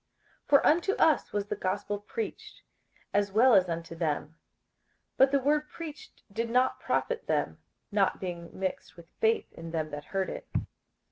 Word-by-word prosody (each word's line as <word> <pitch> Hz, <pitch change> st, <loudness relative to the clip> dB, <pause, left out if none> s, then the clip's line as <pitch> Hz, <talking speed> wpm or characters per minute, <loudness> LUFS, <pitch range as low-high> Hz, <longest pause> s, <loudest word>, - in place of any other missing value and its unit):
58:004:002 -, -, -36 dB
For 285 Hz, -1 st, +6 dB
unto 345 Hz, +5 st, +4 dB
us 320 Hz, -6 st, +3 dB
was 205 Hz, -1 st, -1 dB
the -, -, -3 dB
gospel 200 Hz, +2 st, -2 dB
preached, 430 Hz, -, -6 dB, 0.5 s
as 205 Hz, -1 st, +2 dB
well 235 Hz, +5 st, +6 dB
as 185 Hz, -3 st, +5 dB
unto 165 Hz, 0 st, -4 dB
them: 160 Hz, -1 st, -2 dB, 0.8 s
but 265 Hz, -, +6 dB
the 280 Hz, -, +3 dB
word 300 Hz, +3 st, +1 dB
preached 315 Hz, -3 st, -9 dB
did 230 Hz, +2 st, -1 dB
not 250 Hz, +2 st, +2 dB
profit -, -, -1 dB
them, -, -, 0 dB, 0.3 s
not 200 Hz, -2 st, +2 dB
being 170 Hz, -2 st, -5 dB
mixed 190 Hz, -1 st, -4 dB
with 170 Hz, -, -12 dB
faith 225 Hz, +1 st, +1 dB
in 165 Hz, 0 st, -8 dB
them 160 Hz, -2 st, -2 dB
that 145 Hz, 0 st, -6 dB
heard 195 Hz, -1 st, -2 dB
it. -, -, -8 dB
205 Hz, 165 wpm, -29 LUFS, 170-270 Hz, 0.8 s, For